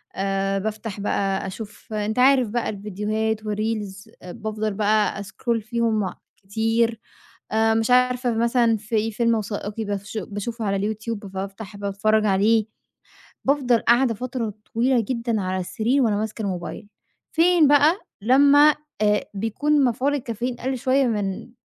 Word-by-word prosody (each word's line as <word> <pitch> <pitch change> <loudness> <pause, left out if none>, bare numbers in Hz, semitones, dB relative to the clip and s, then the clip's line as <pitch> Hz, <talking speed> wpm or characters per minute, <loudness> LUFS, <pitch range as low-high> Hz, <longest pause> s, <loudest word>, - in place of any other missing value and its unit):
آآ 195 0 0
بافتح 215 0 -5
بقى 195 -1 -1
أشوف 210 +2 -9
أنت 215 +2 -1
عارف 260 -2 +5
بقى 235 +1 -1
الـڤيديوهات 215 +2 -2
و 210 - -2
reels 215 -1 -4
آآ 180 - -9
بافضل 215 +1 -3
بقى 210 0 +1
أسكرول 225 +3 -2
فيهم 220 -3 -1 0.2
كتير، 225 +3 0 0.5
آآ 220 +1 +3
مش 225 +2 +1
عارفة 250 -1 +3
فمثلًا، 235 0 +2
في 220 +1 -1
فيلم 230 +1 +1
وثائقي 210 0 -4
بافش 205 +1 -4
باشوفه 215 +3 -4
على 200 +2 0
الYouTube 220 +1 -5
فبافتح 195 +2 -7
باتفرّج 205 +2 +1
عليه. 210 +2 +3 0.8
بافضل 265 -4 +3
قاعدة 240 0 +3
فترة 235 -2 -4 0.2
طويلة 245 +2 +3
جدًا، 235 -3 -1
على 185 0 -2
السرير 230 +9 0
وأنا 220 -4 +2
ماسكة 215 +1 -3
الموبايل. 195 +1 -5 0.4
فين 330 -2 +4
بقى 295 +6 +4 0.2
لمّا 285 +5 +6 0.3
آآ 210 -1 +2
بيكون 270 +8 +1
مفعول 260 +4 +1
الcaffeine 240 0 -4
قَل 260 0 -1
شوية 265 +3 +2
من 205 -1 -2
220 Hz, 140 wpm, -23 LUFS, 205-240 Hz, 0.8 s, لمّا